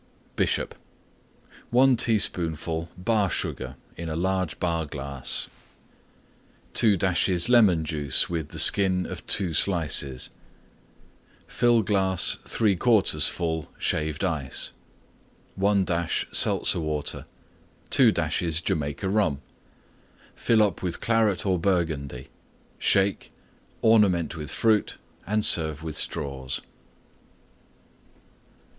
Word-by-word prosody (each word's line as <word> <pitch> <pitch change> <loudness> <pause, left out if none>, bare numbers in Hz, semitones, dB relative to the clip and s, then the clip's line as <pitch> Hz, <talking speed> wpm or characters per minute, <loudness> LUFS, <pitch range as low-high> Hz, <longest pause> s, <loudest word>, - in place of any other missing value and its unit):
BISHOP - - -1 1.0
1 130 +2 +4
teaspoonful 85 -8 -1
Bar 100 +1 0
Sugar - - -4 0.2
in 85 - -7
large 95 -4 -2
Bar 85 -3 -1
glass. 70 -2 -2 1.3
2 105 -4 +4
dashes 90 +2 +1
Lemon 100 -10 +4
Juice 75 -4 0
with 80 -4 -4
the - - -9
Skin 95 -2 +4
of - - -8
Two 90 -4 +3
Slices. 75 -8 0 1.1
Fill 120 -2 +2
glass 95 -2 +2
3/4 100 -6 +2
full 80 -3 -4
Shaved 75 +2 -2
Ice. 80 -8 -2 0.8
1 100 0 +1
dash 85 -1 -1
Seltzer - - +3
Water. 75 -2 -4 0.6
2 - - +5
dashes 85 -2 -1
Jamaica 80 -1 -2
Rum. 95 -8 0 0.9
Fill 110 -2 +2
up 100 -5 -1
with 90 -2 -4
Claret 110 -5 +1
or 95 -3 +1
Burgundy; 80 -8 -2 0.5
shake; 100 0 +1 0.5
ornament 100 -8 +3
with 75 -3 -7
Fruit 110 -2 0 0.3
and 105 +1 0
serve 80 -2 +3
with 80 -2 -5
Straws. 70 -5 -3
90 Hz, 100 wpm, -25 LUFS, 80-100 Hz, 1.3 s, 2